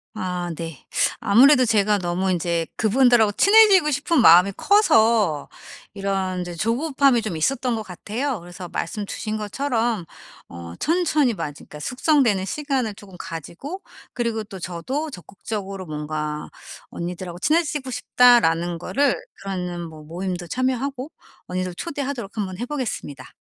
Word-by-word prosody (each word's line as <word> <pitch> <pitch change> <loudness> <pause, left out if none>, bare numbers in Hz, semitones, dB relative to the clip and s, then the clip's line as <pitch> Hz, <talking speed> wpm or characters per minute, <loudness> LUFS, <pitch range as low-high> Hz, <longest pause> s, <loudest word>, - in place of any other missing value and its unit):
아 180 -4 -3
네. 165 -3 -8 0.4
아무래도 255 +5 +6
제가 210 -2 +3
너무 185 +1 -1
이제 170 -1 -1
그분들하고 230 -1 +4
친해지고 400 - +6
싶은 290 +1 +1
마음이 180 +1 +7
커서 225 - +3 0.5
이런 195 -2 -2
이제 175 0 -5
조급함이 250 - +1
좀 200 -7 -3
있었던 250 - 0
것 220 - -3
같아요. 215 +7 -4
그래서 175 +1 -9
말씀 205 +4 -4
주신 215 0 -4
것처럼 225 -2 -1 0.4
어 85 0 -9
천천히 310 -7 +2
마지 145 -6 -6
그러니까 150 - -11
숙성되는 250 - +2
시간을 270 -5 -2
쪼금 200 -2 -14
가지고 180 - -7 0.3
그리고 230 -3 -2
또 195 -3 -10
저도 255 - -4
적극적으로 195 - -7
뭔가 150 0 -4 0.4
"언니들하고 175 0 -6
친해지고 300 - 0
싶다."라는 175 -10 +3
거를 275 +10 +1 0.3
그런 180 -3 -4
뭐 155 -1 -12
모임도 175 +3 -4
참여하고 255 - -2 0.4
언니들 185 0 -3
초대하도록 270 - -5
한번 190 -2 -3
해 240 - -2
보겠습니다. 220 - -5
210 Hz, 330 characters per minute, -22 LUFS, 175-260 Hz, 0.5 s, 마음이